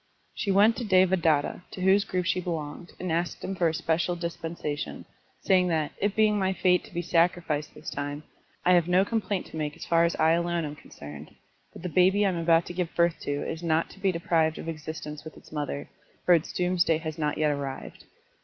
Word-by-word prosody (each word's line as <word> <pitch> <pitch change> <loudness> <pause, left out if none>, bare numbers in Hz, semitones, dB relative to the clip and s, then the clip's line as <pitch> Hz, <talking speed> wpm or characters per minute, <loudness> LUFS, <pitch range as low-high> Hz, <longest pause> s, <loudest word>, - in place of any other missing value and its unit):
She 205 - -3
Vent 205 +4 +5
to 245 - -3
Devadatta, 185 -7 +3
to 185 - -8
whose 195 +2 +4
group 180 -1 -2
she 180 +1 +1
belonged, 165 -1 -5
and 180 -2 -3
asked 170 +2 -2
him 195 - -3
for 175 -2 +2
a 160 - 0
special 170 +3 0
dispensation, 165 -3 -5 0.4
saying 185 -1 +3
that 160 -3 0
" - - -18
It 205 0 +1
being 215 -1 +3
my 190 0 +1
fate 180 -1 +2
to - - -15
be 175 -1 -3
sacrificed 165 -3 +1
this - - -7
time, 145 +1 -4 0.4
I 180 - +6
have 175 -2 +4
no 180 +2 +4
complaint 205 -3 -1
to - - -7
make 150 -1 -3
as - - -8
far 170 0 +3
as 170 - +1
I 160 0 +3
alone 170 0 +1
am 150 0 -6
concerned, 75 - -11 0.4
but - - -12
the - - -2
baby 190 +4 +4
I - - +3
am 180 - -2
about 165 0 +3
to - - -7
give 175 -2 -3
birth 170 -1 +2
to 145 0 -3
is 160 - -4
not 165 -1 +1
to - - -15
be 195 -1 +2
deprived 165 -2 +1
of - - -7
existence 155 -1 -6
with 155 - -10
its - - -17
mother, 145 -2 -4 0.4
for 180 - +6
its 165 -2 +2
doomsday 180 -2 +2
has 155 0 -6
not 150 -1 0
yet 155 -1 +2
arrived. 140 -2 -6
170 Hz, 220 wpm, -27 LUFS, 155-185 Hz, 0.4 s, I